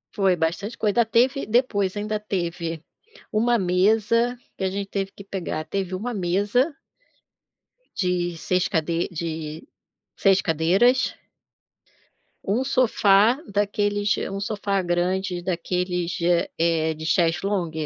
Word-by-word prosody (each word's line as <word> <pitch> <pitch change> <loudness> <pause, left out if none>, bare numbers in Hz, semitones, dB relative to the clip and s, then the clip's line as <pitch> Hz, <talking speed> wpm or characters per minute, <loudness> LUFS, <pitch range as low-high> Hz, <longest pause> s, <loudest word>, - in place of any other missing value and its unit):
Foi, 195 -3 +3
bastante 175 +7 -2
coisa. 215 +2 +2
Ah - - +2
teve 250 +5 +2
depois 210 -4 +1
ainda 210 +1 -2
teve 170 -5 -3 0.5
1 235 +3 +2
mesa, 215 +6 +2 0.2
que - - -4
a 190 - +1
gente 200 +1 -4
teve 195 -1 -3
que 200 - -12
pegar, 180 -5 -4
teve 190 +2 -3
1 235 +6 -4
mesa 205 - +1 1.2
de 180 -2 0
6 180 +2 0
cade 165 +1 0
de 160 0 -5 0.5
6 195 -1 +4
cadeiras. 190 +11 +2 1.3
1 220 +7 0
sofá 235 -2 +3
daqueles 205 0 +1 0.2
1 195 - -4
sofá 200 -1 -1
grande 180 +1 -1
daqueles 180 0 -2
de, 170 - -3
eh 175 -1 +2
eh, 160 -1 +1
de 155 0 -8
chest 165 +1 +2
long. 195 -5 -1
195 Hz, 130 wpm, -24 LUFS, 175-210 Hz, 1.3 s, 6